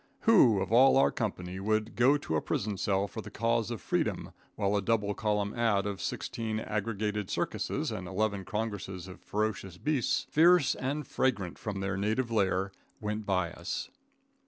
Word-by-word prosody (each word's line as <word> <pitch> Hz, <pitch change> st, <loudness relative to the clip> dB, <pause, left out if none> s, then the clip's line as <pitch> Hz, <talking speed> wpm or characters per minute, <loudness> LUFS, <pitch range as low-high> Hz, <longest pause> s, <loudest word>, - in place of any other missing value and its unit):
Who, 135 Hz, -, +6 dB
of 95 Hz, +1 st, -3 dB
all 130 Hz, +3 st, +7 dB
our 135 Hz, -, +5 dB
company, 95 Hz, -5 st, -3 dB
would 110 Hz, +2 st, 0 dB
go 130 Hz, +5 st, +5 dB
to 80 Hz, -, -3 dB
a 75 Hz, -, +1 dB
prison 105 Hz, 0 st, -2 dB
cell 100 Hz, 0 st, +1 dB
for 110 Hz, -, -6 dB
the -, -, -9 dB
cause 115 Hz, 0 st, 0 dB
of 115 Hz, -5 st, -5 dB
freedom -, -, -1 dB, 0.2 s
while 100 Hz, -1 st, +1 dB
a 100 Hz, -, +2 dB
double 105 Hz, -1 st, +1 dB
column 105 Hz, -1 st, -1 dB
ad. 110 Hz, -4 st, +1 dB
of 100 Hz, -2 st, -3 dB
sixteen 110 Hz, -2 st, -3 dB
aggregated 105 Hz, -2 st, -2 dB
circuses, -, -, -2 dB
and 90 Hz, -1 st, -5 dB
eleven 100 Hz, +1 st, -1 dB
congresses 95 Hz, -3 st, -4 dB
of 90 Hz, -, -11 dB
ferocious 105 Hz, -4 st, -2 dB
beasts, 145 Hz, +1 st, 0 dB
fierce 165 Hz, -2 st, +5 dB
and 145 Hz, +3 st, -3 dB
fragrant 110 Hz, -10 st, -1 dB
from 100 Hz, -3 st, -4 dB
their 95 Hz, 0 st, -2 dB
native 110 Hz, +5 st, 0 dB
lair, 95 Hz, -2 st, +1 dB, 0.3 s
went 105 Hz, 0 st, -3 dB
by 90 Hz, -3 st, +1 dB
us? 85 Hz, +1 st, -5 dB
105 Hz, 170 wpm, -30 LUFS, 95-115 Hz, 0.3 s, all